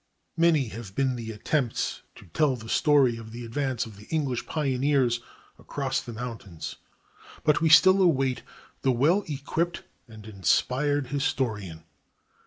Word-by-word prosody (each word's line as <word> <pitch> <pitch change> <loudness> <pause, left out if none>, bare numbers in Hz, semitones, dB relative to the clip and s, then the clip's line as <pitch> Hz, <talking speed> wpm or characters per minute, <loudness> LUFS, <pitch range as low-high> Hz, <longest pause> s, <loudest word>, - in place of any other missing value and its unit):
Many 160 -7 +3
have 110 -4 -9
been 130 -2 +1
the 115 -2 -6
attempts 120 +4 -1
to - - -14
tell 135 - +1
the 110 -2 -10
story 140 -5 +3
of 110 -1 -10
the 120 +1 -7
advance 130 +1 -2
of 110 -3 -12
the 105 - -13
English 140 -7 -2
pioneers 135 -4 +1 0.4
across 135 -2 -2
the 120 - -8
mountains, 110 -8 -7 0.7
but 150 +1 +3
we 165 - +3
still 185 +5 +7
await 135 -8 +2 0.4
the 130 - +2
well 155 +11 +3
equipped 160 +4 -2 0.2
and 110 -2 -13
inspired 125 - 0
historian. 110 - -2
130 Hz, 140 wpm, -26 LUFS, 115-145 Hz, 0.7 s, still